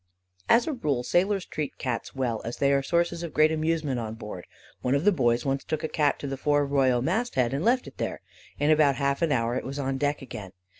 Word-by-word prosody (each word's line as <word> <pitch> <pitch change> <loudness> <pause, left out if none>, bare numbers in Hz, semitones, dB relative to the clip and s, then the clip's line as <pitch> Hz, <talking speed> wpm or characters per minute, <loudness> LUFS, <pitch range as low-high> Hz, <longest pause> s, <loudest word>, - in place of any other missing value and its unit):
"As 235 - +5
a 315 - -2
rule, 145 - -1
sailors 190 +6 +1
treat 150 -3 -5
Cats 125 0 -4
well, 120 -4 -1
as 115 - -5
they 140 0 +3
are 140 - +3
sources 170 +3 0
of 170 -3 -6
great 155 +1 +5
amusement 155 -4 0
on 110 -1 -5
board. 105 -5 -8 0.3
One 125 +2 +1
of 140 +5 0
the 205 - +6
boys 120 -8 +1
once 135 0 -1
took 155 0 -3
a - - 0
Cat 150 -2 +1
to 140 - -4
the 135 0 -4
fore 145 +1 +2
royal 130 -3 +2
mast 240 - -1
head, 125 -1 +2
and 140 +4 -1
left 250 +4 +2
it - - -12
there. - - -3 0.4
In 145 +2 +2
about 150 -3 +4
half 140 +1 0
an 165 -3 +2
hour 120 -3 +1
it 125 - -2
was 135 +2 -5
on 135 -1 -2
deck 145 -1 0
again. 100 -7 -8
140 Hz, 245 wpm, -27 LUFS, 130-155 Hz, 0.4 s, the